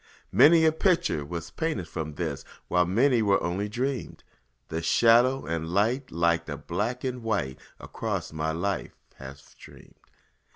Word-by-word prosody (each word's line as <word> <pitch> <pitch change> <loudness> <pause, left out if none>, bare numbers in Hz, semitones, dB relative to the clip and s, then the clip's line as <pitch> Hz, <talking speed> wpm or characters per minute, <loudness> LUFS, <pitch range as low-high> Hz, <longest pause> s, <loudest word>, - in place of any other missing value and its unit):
Many 160 +1 +6
a 160 - +5
picture 170 - +1
was 85 +3 -6
painted 155 - -3
from 80 -3 -5
this, 75 -4 -4 0.3
While 90 -1 +2
many 120 +6 +3
were 100 -2 +3
only 95 +4 -2
dreamed; 130 +4 -4 0.5
And 80 +1 -3
shadow 120 +8 +4
and 80 0 -3
light 115 +9 0
like 85 0 +1
the - - -5
black 110 +8 -3
and 125 -2 -3
white 70 - -2 0.2
Across - - -4
my 80 0 -2
life 95 +5 -3 0.2
have 70 +1 -10
streamed. - - -17
100 Hz, 150 wpm, -27 LUFS, 80-125 Hz, 0.5 s, Many